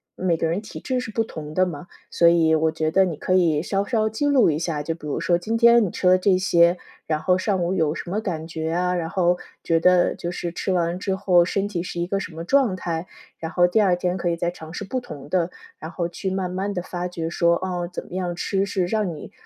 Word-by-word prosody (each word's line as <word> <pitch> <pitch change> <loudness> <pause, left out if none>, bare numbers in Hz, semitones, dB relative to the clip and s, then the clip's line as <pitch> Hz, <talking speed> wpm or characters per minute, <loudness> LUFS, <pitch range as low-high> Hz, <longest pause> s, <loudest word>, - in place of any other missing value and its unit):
每 180 -3 0
个 165 - 0
人 170 +5 -1
体 210 - -9
质 255 -1 -1
是 250 -1 -5
不 225 +1 0
同 155 -7 -8
的 185 - +4
嘛， 170 -2 -7 0.2
所 170 - +4
以 165 -2 +3
我 160 0 +2
觉 155 -1 -1
得 190 +3 +4
你 175 -4 -3
可 185 - -1
以 165 -5 +3
稍 195 +2 0
稍 220 -1 +1
记 220 +7 -1
录 265 - +4
一 150 - -2
下， 160 -3 -2
就 165 - -2
比 155 -2 -9
如 145 - -2
说 170 +2 +2
今 220 +6 -2
天 235 0 +6
你 - - -2
吃 - - -5
了 180 - +7
这 185 0 +3
些， 175 -1 +4 0.3
然 155 -1 0
后 180 -1 +3
上 190 -2 0
午 175 +2 0
有 160 -4 +1
什 170 - -6
么 210 +3 -1
感 165 -7 -4
觉 160 -1 -3
啊， 180 +1 0
然 165 -2 -2
后 175 -1 +2 0.3
觉 165 -1 +2
得 180 +1 +4
就 170 - -5
是 175 -1 -4
吃 185 - -3
完 175 0 0
之 190 +1 -1
后 185 -3 +4
身 195 +2 -1
体 190 -5 -3
是 175 - -5
一 - - 0
个 195 +2 -1
什 185 - -7
么 165 - -5
状 250 0 +2
态， 170 -1 -4 0.3
然 160 0 -5
后 180 - +2 0.2
二 190 -3 +3
天 180 0 -1
可 175 -1 -1
以 170 - 0
再 175 +1 -1
尝 160 -2 -11
试 190 - -5
不 255 +6 -3
同 150 - -10
的。 175 0 +1 0.3
然 160 - -7
后 175 -2 -2
去 190 +3 -4
慢 190 -1 -2
慢 190 +2 -2
地 180 - -2
发 180 0 -4
掘 170 -2 -4
说， 170 0 +2
哦， 175 -1 -3
怎 - - -6
么 - - -13
样 180 -2 -2
吃 195 +2 -1
是 190 -2 -1
让 200 -4 -1
你 - - -10
180 Hz, 285 characters per minute, -23 LUFS, 165-190 Hz, 0.3 s, 了